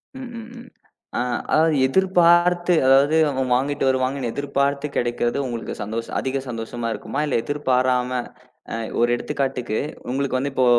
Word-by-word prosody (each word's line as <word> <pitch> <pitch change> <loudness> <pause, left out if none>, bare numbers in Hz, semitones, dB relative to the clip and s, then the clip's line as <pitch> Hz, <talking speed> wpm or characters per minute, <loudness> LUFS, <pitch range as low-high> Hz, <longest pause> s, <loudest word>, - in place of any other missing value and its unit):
ம். 260 -2 -7
ம். 225 - -9
ம் 240 - -12 0.5
அ - - +1 0.3
அதாவது 160 0 +4
எதிர்பார்த்து 175 +1 +4
அதாவது 140 +4 +5 0.4
வாங்கிட்டு 140 +3 0
வருவாங்கன்னு 130 -1 0
எதிர்பார்த்து 140 0 -1
கிடைக்கிறது 120 0 0
உங்களுக்குச் 120 -3 -5
சந்தோஷம் 115 +3 -5
அதிக 135 +1 -2
சந்தோஷமா 115 0 -4
இருக்குமா? 105 - -5
இல்ல 145 - -1
எதிர்பாராம 130 -2 +1 0.9
ஒரு 120 0 +3
எடுத்துக்காட்டுக்கு 130 -4 -2 0.3
உங்களுக்கு 135 0 0
வந்து 140 +2 -2
இப்போ 130 -1 +2
135 Hz, 130 wpm, -22 LUFS, 125-150 Hz, 0.9 s, அதாவது